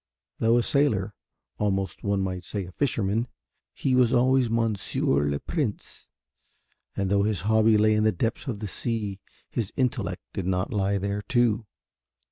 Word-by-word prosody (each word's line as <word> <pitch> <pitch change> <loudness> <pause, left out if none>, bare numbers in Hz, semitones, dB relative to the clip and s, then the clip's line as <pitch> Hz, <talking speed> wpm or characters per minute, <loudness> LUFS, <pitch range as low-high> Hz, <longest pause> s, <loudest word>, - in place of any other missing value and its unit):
Though 115 +1 +4
a 120 - +2
sailor, 110 -10 +1 0.5
almost 95 -3 -1
one 100 -1 +1
might 95 -1 -3
say 100 +1 -4
a 90 - -10
fisherman, 115 -1 0 0.4
he 135 - -1
was 125 -2 +4
always 130 0 +3
Monsieur 105 -10 +1
le 70 0 -1
Prince 140 -11 -4 0.9
and 100 -1 0
though 100 0 +4
his 100 -4 0
hobby 110 +2 +4
lay 110 +1 +4
in 105 0 +2
the 110 - +4
depths 115 - -2
of 110 -5 -4
the 105 - -3
sea 105 -1 -2 0.3
his 110 -5 -2
intellect 130 -2 -1
did 95 - -3
not 95 +4 -1
lie 100 -1 +1
there 100 +1 -2
too. 115 -2 +1
105 Hz, 160 wpm, -26 LUFS, 95-115 Hz, 0.9 s, Though